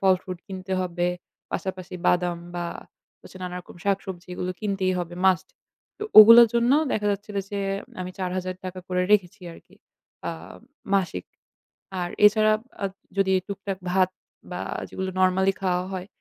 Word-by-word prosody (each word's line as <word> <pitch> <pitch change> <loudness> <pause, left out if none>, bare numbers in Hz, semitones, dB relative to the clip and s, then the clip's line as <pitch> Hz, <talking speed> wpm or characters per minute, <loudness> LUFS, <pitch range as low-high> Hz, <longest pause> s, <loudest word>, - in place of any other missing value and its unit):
ফল-ফ্রুট 185 -1 +1
কিনতে 190 0 -6
হবে। 175 -1 -1 0.5
পাশাপাশি 185 -1 -4
বাদাম 175 -1 +2 0.2
বা 175 0 -2 0.6
হচ্ছে - - -14
নানারকম 180 -1 -7
শাকসবজি 190 -3 -2
এগুলো 180 - -3
কিনতেই 195 -3 0
হবে, 175 0 -4
must 185 0 +3 0.5
তো - - -6 0.2
ওগুলোর 230 +2 +11
জন্য 235 +2 +3 0.2
দেখা 210 -1 0
যাচ্ছিলো 205 0 -5
যে 205 - -3 0.4
আমি 180 0 -4
৳৪,০০০ 185 0 -4
করে 180 0 +1
রেখেছি 195 0 +2
আরকি - - -17 0.5
আ - - 0 0.6
মাসিক। 175 - 0 0.8
আর 175 - -2 0.2
এছাড়া 215 +1 +4 0.3
আ - - +2 0.3
যদি 195 -1 +3 0.2
টুকটাক 195 -1 -4
ভাত 185 -1 +3 0.4
বা - - -4 0.3
যেগুলো 190 0 -4
নরমালি 190 +1 +3
খাওয়া 180 -1 +1
হয়, 185 0 -4
185 Hz, 135 wpm, -25 LUFS, 180-195 Hz, 0.8 s, ওগুলোর